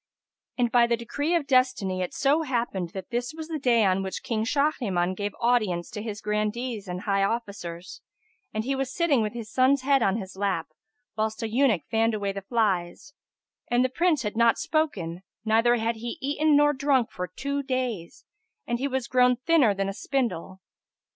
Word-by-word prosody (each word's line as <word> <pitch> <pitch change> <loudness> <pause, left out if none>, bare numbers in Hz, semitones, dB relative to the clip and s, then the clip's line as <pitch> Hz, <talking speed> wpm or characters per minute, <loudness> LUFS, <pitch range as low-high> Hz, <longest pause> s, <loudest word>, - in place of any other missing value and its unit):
And 240 -2 +1
by 240 -1 +5
the 235 0 +1
decree 285 +8 -1
of 330 -4 +1
destiny 255 -8 +2
it 180 - -2
so 295 +2 +2
happened 235 - -2
that 190 +5 -7
this 245 +5 -2
was 320 0 -7
the 315 -2 -3
day 235 -5 +3
on 190 0 +2
which 190 -1 -5
King 220 -2 -1
Shahriman 225 -10 0
gave 205 +1 -4
audience 215 -8 +1
to 210 -1 -5
his 215 -1 -6
Grandees 210 +1 -2
and 180 0 -4
high 195 -1 +1
officers, 195 -5 -4 0.5
and 215 - -2
he 270 +4 -1
was 270 -1 -2
sitting, 315 -7 +2
with 215 0 -2
his 230 -3 -7
son's 260 +1 +3
head 275 -1 +3
on 195 -1 +2
his 190 -3 -7
lap, 190 -4 -1 0.5
whilst 220 +1 -2
an 220 - -3
eunuch 230 - +2
fanned 225 0 +2
away 200 -2 -2
the 195 0 -6
flies; 195 +3 -1 0.5
and 240 +1 +2
the - - 0
Prince 335 +2 +1
had 210 0 -3
not 235 0 +4
spoken 205 - -1 0.2
neither 225 +2 +4
had 230 0 -1
he 235 +7 -5
eaten 290 +2 +2
nor 295 0 +5
drunk 270 -3 +1
for 180 0 -4
two 280 +10 -3
days, 255 -10 -3 0.4
and 240 0 -2
he 275 - 0
was 265 -2 -2
grown 250 0 +4
thinner 255 -5 +3
than 195 0 -1
a 195 - -3
spindle. 200 - -3
235 Hz, 190 wpm, -26 LUFS, 200-265 Hz, 0.5 s, by